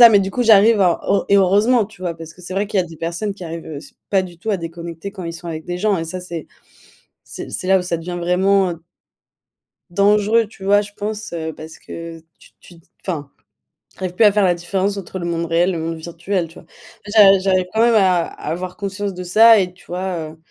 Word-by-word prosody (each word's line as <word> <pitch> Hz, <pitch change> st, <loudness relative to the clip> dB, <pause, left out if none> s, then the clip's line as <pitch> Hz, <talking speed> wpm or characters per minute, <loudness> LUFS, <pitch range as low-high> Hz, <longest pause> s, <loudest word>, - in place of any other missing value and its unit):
ça. 235 Hz, -, +12 dB
Mais 205 Hz, -3 st, +5 dB
du 195 Hz, 0 st, -2 dB
coup, 245 Hz, -, -1 dB
j'arrive 220 Hz, -1 st, +6 dB
à 180 Hz, -3 st, +3 dB, 0.3 s
et 200 Hz, -, +5 dB
heureusement, 205 Hz, +5 st, +4 dB
tu 200 Hz, -2 st, -16 dB
vois, 170 Hz, -2 st, -2 dB
parce 165 Hz, 0 st, -10 dB
que 180 Hz, -, -17 dB
c'est 180 Hz, +1 st, -7 dB
vrai 200 Hz, +1 st, 0 dB
qu'il 200 Hz, -2 st, +1 dB
y -, -, +1 dB
a -, -, -8 dB
des 165 Hz, -1 st, -12 dB
personnes 175 Hz, +6 st, -3 dB
qui 185 Hz, -, -10 dB
arrivent, 165 Hz, 0 st, -7 dB
heu, 155 Hz, -, -7 dB
s 140 Hz, -, -11 dB, 0.2 s
pas 195 Hz, -2 st, +3 dB
du 175 Hz, -2 st, -10 dB
tout 220 Hz, +6 st, -3 dB
à 200 Hz, -, +1 dB
déconnecter 170 Hz, +2 st, -7 dB
quand 185 Hz, -4 st, -8 dB
ils 165 Hz, -, -4 dB
sont 170 Hz, 0 st, -8 dB
avec 160 Hz, -1 st, -5 dB
des 175 Hz, -, -3 dB
gens, 200 Hz, -2 st, +1 dB
et 165 Hz, -, -3 dB
ça, 185 Hz, +3 st, -5 dB
c'est 170 Hz, -3 st, -7 dB, 0.8 s
c'est -, -, -8 dB
c'est 185 Hz, -, -4 dB
là 190 Hz, 0 st, +5 dB
où -, -, -3 dB
ça 175 Hz, -2 st, -2 dB
devient 175 Hz, +1 st, -6 dB
vraiment, 190 Hz, +2 st, +2 dB
heu 165 Hz, -, -10 dB, 1.1 s
dangereux, 210 Hz, +4 st, +3 dB
tu 200 Hz, -2 st, -14 dB
vois, 205 Hz, +1 st, +4 dB
je 205 Hz, 0 st, -9 dB
pense, 210 Hz, -2 st, -5 dB
heu, 160 Hz, -1 st, -4 dB
parce 160 Hz, +1 st, -11 dB
que 165 Hz, -1 st, -9 dB, 0.2 s
tu -, -, -19 dB
tu 175 Hz, -, -15 dB, 0.3 s
enfin, 150 Hz, -7 st, -4 dB, 0.7 s
tu -, -, -29 dB
arrives 180 Hz, -1 st, -3 dB
plus 220 Hz, -, +4 dB
à 205 Hz, -, +7 dB
faire 205 Hz, -1 st, +2 dB
la 175 Hz, -1 st, +3 dB
différence 190 Hz, +3 st, -2 dB
entre 190 Hz, 0 st, -6 dB
le 170 Hz, -, -5 dB
monde 170 Hz, 0 st, -2 dB
réel, 170 Hz, +3 st, +2 dB
le 170 Hz, -, -3 dB
monde 165 Hz, +1 st, -3 dB
virtuel, 170 Hz, +2 st, -3 dB
tu 165 Hz, -, -18 dB
vois? -, -, -14 dB, 0.4 s
J'a 205 Hz, -2 st, +6 dB
j'arrive 185 Hz, -1 st, +1 dB
quand 220 Hz, -, 0 dB
même 235 Hz, 0 st, +5 dB
à 185 Hz, -5 st, +4 dB
avoir 180 Hz, +4 st, -5 dB
conscience 200 Hz, -1 st, -4 dB
de 180 Hz, -, -6 dB
ça, 220 Hz, +5 st, +6 dB
et 180 Hz, -2 st, 0 dB
tu 180 Hz, -, -22 dB
vois, 180 Hz, 0 st, -3 dB, 0.2 s
heu. -, -, -17 dB
185 Hz, 250 wpm, -19 LUFS, 170-200 Hz, 1.1 s, ça